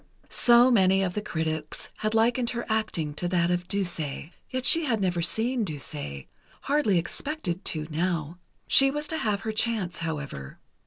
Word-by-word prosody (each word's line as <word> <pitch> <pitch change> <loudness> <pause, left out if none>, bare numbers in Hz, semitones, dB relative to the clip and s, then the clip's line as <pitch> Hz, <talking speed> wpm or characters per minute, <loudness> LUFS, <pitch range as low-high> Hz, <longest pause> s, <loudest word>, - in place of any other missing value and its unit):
So 240 +1 +6
many 190 -3 +4
of 180 -2 -1
the 210 - -2
critics 160 -5 -3
had 215 +1 -1
likened 235 +2 +2
her 235 0 -4
acting 215 -9 -1
to 175 +4 -3
that 175 -1 +1
of 175 0 -1
Duse. 190 -4 -1
Yet 160 - -6
she 330 -1 +4
had 230 -6 0
never 180 -3 0
seen 230 +8 0
Duse... 145 - -5 0.4
hardly 275 -10 +2
expected 185 - -3
to, 155 -2 -1
now. 170 0 -2 0.3
She 270 0 +5
was 295 +2 -2
to 320 - -2
have 205 -2 -1
her 220 - -3
chance, 215 -5 -1
however. 145 - -5
190 Hz, 165 wpm, -26 LUFS, 165-235 Hz, 0.4 s, So